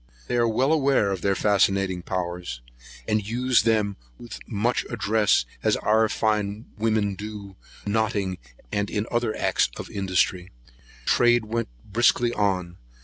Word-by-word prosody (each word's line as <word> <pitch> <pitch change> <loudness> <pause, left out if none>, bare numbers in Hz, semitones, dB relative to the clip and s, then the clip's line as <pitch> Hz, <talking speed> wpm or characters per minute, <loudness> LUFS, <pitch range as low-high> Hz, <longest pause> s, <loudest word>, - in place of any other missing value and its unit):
They - - -2
are 120 -1 +3
well 130 +7 +2
aware 135 -9 +2
of 95 -3 -3
their 100 +1 +1
fascinating 95 -3 +2
powers, 90 -8 -4 0.5
and 105 -1 +1
use 125 +4 +2
them 105 -2 +1 0.2
with 120 - -12
as - - -7
much 115 +3 0
address 110 - +2 0.2
as - - +2
our 110 +1 +2
fine 105 0 -1
women 110 -2 0
do 100 -1 -8 0.3
notting, 100 -3 -1 0.3
and 100 0 -1 0.2
other 120 -2 0
acts - - +1
of - - -7
industry. 95 -2 0 0.6
Trade 120 -1 +4
went 115 +1 -2 0.2
briskly 120 +2 +2
on. 95 -4 -1
105 Hz, 140 wpm, -25 LUFS, 95-115 Hz, 0.6 s, Trade